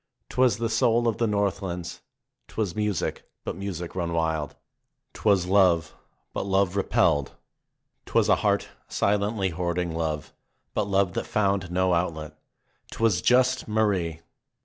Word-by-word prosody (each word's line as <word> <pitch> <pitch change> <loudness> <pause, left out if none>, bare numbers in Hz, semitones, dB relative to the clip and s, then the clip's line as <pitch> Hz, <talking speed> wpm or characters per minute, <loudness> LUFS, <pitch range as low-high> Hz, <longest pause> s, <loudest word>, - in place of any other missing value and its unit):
'Twas 125 -4 +3
the 115 0 -1
soul 115 +1 +2
of 115 - 0
the 115 - +2
northlands; 100 -4 -2 0.5
Twas 100 -6 -3
music, 105 -5 -2
but - - -4
music 90 -3 -5
run 85 -2 -2
wild; 80 -2 -1 0.6
'twas 100 -4 +2
love, 90 -4 +3 0.4
but - - -2
love 95 -1 +1
repelled; 75 -7 +2 0.7
Twas - - +2
a - - +4
heart - - +1 0.2
silently 100 -1 0
hoarding 85 0 -2
love, 80 -2 -3 0.4
but 105 - 0
love 95 -2 +2
that - - -3
found 100 -3 0
no 90 0 +2
outlet. 80 -3 -2 0.5
'Twas 110 -6 +1
just 130 +2 +3
Marie 100 -7 0
95 Hz, 130 wpm, -26 LUFS, 85-105 Hz, 0.7 s, a